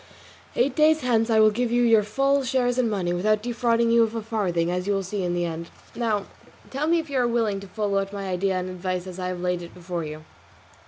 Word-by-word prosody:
Eight 260 Hz, +4 st, +1 dB
days 310 Hz, 0 st, +4 dB
hence 235 Hz, -2 st, +1 dB
I 220 Hz, -1 st, +4 dB
will 215 Hz, 0 st, +6 dB
give 240 Hz, +2 st, -1 dB
you 245 Hz, 0 st, +3 dB
your 225 Hz, -2 st, +5 dB
full 275 Hz, +6 st, +1 dB
shares 255 Hz, -1 st, +1 dB
in 240 Hz, -3 st, +2 dB
money, 185 Hz, -4 st, -1 dB
without 210 Hz, +4 st, +1 dB
defrauding 235 Hz, -1 st, +1 dB
you 235 Hz, 0 st, +5 dB
of 225 Hz, 0 st, +1 dB
a 225 Hz, -, -3 dB
farthing, 180 Hz, -7 st, -1 dB
as 180 Hz, +1 st, -2 dB
you 205 Hz, -, +2 dB
will 195 Hz, -1 st, -1 dB
see 195 Hz, +2 st, -3 dB
in 175 Hz, 0 st, -1 dB
the 175 Hz, 0 st, 0 dB
end. 170 Hz, 0 st, -5 dB, 0.2 s
Now 220 Hz, -4 st, -1 dB, 0.5 s
tell 280 Hz, +3 st, -1 dB
me 340 Hz, +1 st, +3 dB
if 325 Hz, -1 st, -2 dB
you 275 Hz, -2 st, -1 dB
are 245 Hz, -, +2 dB
willing 225 Hz, -4 st, 0 dB
to 200 Hz, -, -10 dB
follow 200 Hz, 0 st, -1 dB
out 195 Hz, 0 st, -3 dB
my 200 Hz, -1 st, -5 dB
idea 190 Hz, +1 st, 0 dB
and 185 Hz, 0 st, -2 dB
advice 185 Hz, 0 st, -3 dB
as 185 Hz, 0 st, -8 dB
I 180 Hz, -, -2 dB
have 180 Hz, -1 st, -4 dB
laid 180 Hz, -1 st, -1 dB
it 170 Hz, -, -10 dB
before 175 Hz, -1 st, -4 dB
you." 155 Hz, 0 st, -7 dB
210 Hz, 255 wpm, -24 LUFS, 180-240 Hz, 0.5 s, will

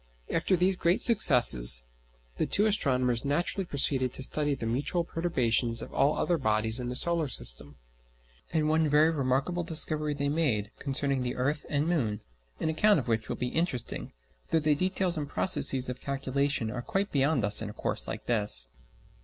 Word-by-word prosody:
After 165 Hz, +3 st, 0 dB
these 185 Hz, +2 st, 0 dB
great 175 Hz, +1 st, 0 dB
successes 120 Hz, -, +7 dB, 0.5 s
the -, -, -2 dB
two 205 Hz, -, +3 dB
astronomers 130 Hz, -, 0 dB
naturally 170 Hz, +7 st, -1 dB
proceeded 135 Hz, -4 st, +1 dB
to 130 Hz, -, -4 dB
study 145 Hz, +1 st, 0 dB
the 125 Hz, -, -7 dB
mutual 140 Hz, +9 st, -2 dB
perturbations 120 Hz, -9 st, -1 dB
of -, -, -12 dB
all 140 Hz, +3 st, +1 dB
other 175 Hz, -2 st, -1 dB
bodies 110 Hz, -1 st, -1 dB
in 120 Hz, -1 st, -5 dB
the 125 Hz, -, -6 dB
solar 170 Hz, +2 st, -2 dB
system. -, -, -1 dB, 0.8 s
And 155 Hz, -2 st, -1 dB
one 160 Hz, 0 st, +1 dB
very 150 Hz, +2 st, +3 dB
remarkable 140 Hz, +4 st, -2 dB
discovery 155 Hz, -2 st, 0 dB
they 140 Hz, 0 st, -3 dB
made 135 Hz, -9 st, -2 dB
concerning 140 Hz, -1 st, -2 dB
the 125 Hz, 0 st, -4 dB
earth 145 Hz, +4 st, -3 dB
and 145 Hz, +1 st, -1 dB
moon, 120 Hz, -12 st, -2 dB, 0.4 s
an -, -, -2 dB
account 205 Hz, +6 st, +2 dB
of 130 Hz, -, -7 dB
which 115 Hz, -1 st, -2 dB
will -, -, -3 dB
be 125 Hz, -, -4 dB
interesting, 160 Hz, -7 st, -4 dB, 0.4 s
though -, -, +1 dB
the 150 Hz, -1 st, +1 dB
details 185 Hz, +2 st, -2 dB
and 145 Hz, -1 st, -6 dB
processes 135 Hz, -8 st, 0 dB
of 125 Hz, 0 st, -7 dB
calculation 140 Hz, -3 st, -3 dB
are 120 Hz, 0 st, -6 dB
quite 195 Hz, +10 st, -3 dB
beyond 140 Hz, -2 st, 0 dB
us 105 Hz, +1 st, +5 dB
in 110 Hz, -, -5 dB
a -, -, -10 dB
course -, -, -1 dB
like -, -, -7 dB
this. 100 Hz, -, -2 dB
140 Hz, 180 wpm, -27 LUFS, 120-160 Hz, 0.8 s, successes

